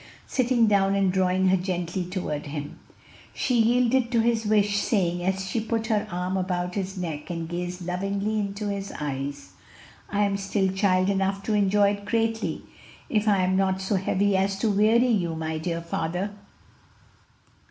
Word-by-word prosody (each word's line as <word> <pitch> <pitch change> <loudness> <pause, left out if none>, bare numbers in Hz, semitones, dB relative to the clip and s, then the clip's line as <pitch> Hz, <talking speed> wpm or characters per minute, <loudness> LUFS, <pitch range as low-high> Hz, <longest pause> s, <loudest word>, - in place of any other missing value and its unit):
sitting 250 -2 +2
down 200 -2 +3
and 195 -2 +2
drawing 185 0 +2
her 190 - +5
gently 180 -1 -2
toward 175 -5 -4
him. 145 0 -6 0.6
She 250 -3 +1
yielded 245 +1 +2
to 235 - +3
his 225 -1 +1
wish, 205 -1 +3
saying, 175 -5 0
as 190 +1 -1
she 220 +4 -1
put 225 0 -2
her 210 - 0
arm 180 +2 -2
about 180 -1 -2
his 195 0 -3
neck 160 -4 -5
and 165 -2 -4
gazed 175 +1 -4
lovingly 200 +4 -1
into 200 +1 -3
his 200 0 -4
eyes, 140 -8 -4 0.6
"I 205 +1 +1
am 200 -1 +1
still 195 -1 0
child 190 -1 +2
enough 195 0 -1
to 220 - -1
enjoy 205 0 +4
it 200 0 -6
greatly, 225 0 -1 0.5
if 215 -1 +1
I 200 -3 +4
am 185 +1 +1
not 190 0 +1
so 190 +2 -2
heavy 195 +1 +1
as 195 +1 +1
to 220 - +2
weary 215 +4 +4
you, 185 -9 +1
my 160 0 -3
dear 170 +1 -3
father." 175 +4 -2
195 Hz, 170 wpm, -25 LUFS, 180-210 Hz, 0.6 s, her